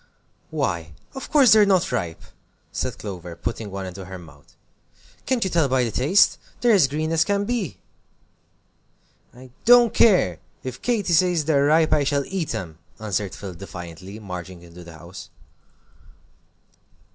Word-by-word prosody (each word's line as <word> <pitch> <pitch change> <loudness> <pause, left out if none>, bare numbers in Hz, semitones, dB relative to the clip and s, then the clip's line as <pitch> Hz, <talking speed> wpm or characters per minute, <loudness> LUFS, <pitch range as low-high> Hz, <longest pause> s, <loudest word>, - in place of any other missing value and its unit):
"Why, 80 -3 -2 0.2
of 265 - -7
course 275 -7 +6
they're 215 -1 +7
not 190 -3 +2
ripe!" 85 -4 -3 0.5
said - - -3
Clover, 90 -4 -7
putting 105 +5 -5
one 95 0 -5
into 95 +1 -8
her 95 +1 -8
mouth. 80 -5 -17 0.7
"Can't 255 -3 +1
you 190 - -1
tell 165 -4 +2
by 130 -1 +2
the 115 - -2
taste? 150 - +3 0.2
They're 240 - +3
as 180 -9 +5
green 155 +3 -2
as 160 -1 +3
can 200 +2 0
be." 225 - -3 1.5
"I 125 +1 -15
don't 240 -1 +6
care, 175 - +4 0.2
if 130 -1 -7
Katy 215 -7 0
says 175 -2 +3
they're 140 -3 +3
ripe 155 +2 +4
I 150 -2 +3
shall 140 0 0
eat 190 -5 -3
'em," 80 -4 -6 0.2
answered 105 -2 -3
Phil, 100 -2 -8
defiantly, 90 +1 -9
marching 90 -3 -8
into 85 +1 -13
the 85 -1 -12
house. 90 +4 -11
130 Hz, 155 wpm, -23 LUFS, -, 1.5 s, they're